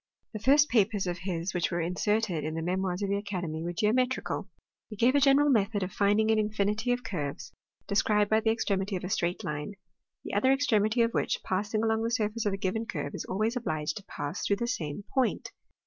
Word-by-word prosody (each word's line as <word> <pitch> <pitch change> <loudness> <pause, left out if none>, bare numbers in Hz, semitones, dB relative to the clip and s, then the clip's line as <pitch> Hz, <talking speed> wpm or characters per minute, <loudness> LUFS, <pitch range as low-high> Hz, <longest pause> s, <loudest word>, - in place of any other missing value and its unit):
The 215 - -4
first 285 +6 +5
papers 210 -3 +2
of 175 -1 -3
his 180 -1 -3
which 175 -1 0
were 175 - -2
inserted 180 +1 0
in 155 +1 -3
the 165 - -3
Memoirs 185 +2 -1
of 200 - -1
the 200 - +2
Academy 180 -6 -4
were 170 +1 -3
geometrical: 250 +8 0 0.4
he 215 - -7
gave 240 +5 +3
a 285 - +4
general 280 +1 +5
method 205 -3 +1
"of 185 - -4
finding 210 +2 +3
an 220 - +3
infinity 210 +2 0
of 245 0 -1
curves, 145 -7 -5 0.3
described 210 +1 +2
by 220 +1 +3
the 220 0 +1
extremity 200 -3 0
of 180 - -4
a 180 - -4
straight 175 -1 -1
line, 150 +5 -4 0.5
the - - -7
other 215 +6 +3
extremity 235 -4 +2
of 230 - +1
which, - - -1
passing 205 +3 -1
along 220 0 +1
the 230 - 0
surface 220 -2 -1
of 200 - 0
a - - -2
given 220 +3 -2
curve, 145 -3 -4
is - - -5
always 215 +5 -1
obliged 155 -11 -2
to 210 - -8
pass 145 +5 -5
through 200 - +2
the 235 - -2
same 165 -6 -3
point. 260 -2 0
205 Hz, 215 wpm, -29 LUFS, 180-225 Hz, 0.5 s, first